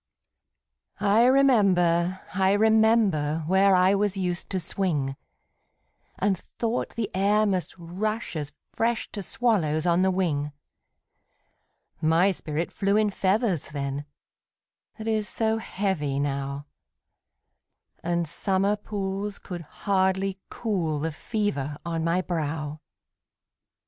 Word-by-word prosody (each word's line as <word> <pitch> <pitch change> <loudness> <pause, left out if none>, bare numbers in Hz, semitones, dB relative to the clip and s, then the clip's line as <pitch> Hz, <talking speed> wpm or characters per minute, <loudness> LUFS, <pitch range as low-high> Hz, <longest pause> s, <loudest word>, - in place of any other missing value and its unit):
I 210 +3 +4
remember, 190 -10 +3
I 190 +1 +3
remember, 215 -8 +3
Where 190 +3 +4
I 185 +1 +5
was 200 -1 +1
used 180 -1 -2
to 190 - -1
swing, 155 -6 -1 1.0
And 195 0 +2
thought 230 +6 -3
the 225 -3 -2
air 205 +3 +3
must 190 -4 -1
rush 200 +6 -3
as 145 -2 -4 0.2
fresh 230 0 -1
To 205 - -5
swallows 180 -9 +1
on 175 0 +3
the 190 - +3
wing; 150 -6 -1 1.5
My 165 +5 +4
spirit 160 -2 -3
flew 200 +1 +1
in 215 -1 +2
feathers 190 - 0
then, 140 -1 -4 0.9
That 220 0 -6
is 215 -2 0
so 220 0 0
heavy 180 -10 -2
now, 140 0 -2 1.4
And 170 0 0
summer 195 +5 +1
pools 200 -1 -4
could 180 -3 -7 0.2
hardly 190 0 +1
cool 180 -9 -1
The 160 +3 -2
fever 150 - -2
on 165 -1 -2
my 170 +3 +1
brow! 155 -3 -3
190 Hz, 115 wpm, -26 LUFS, 160-205 Hz, 1.5 s, I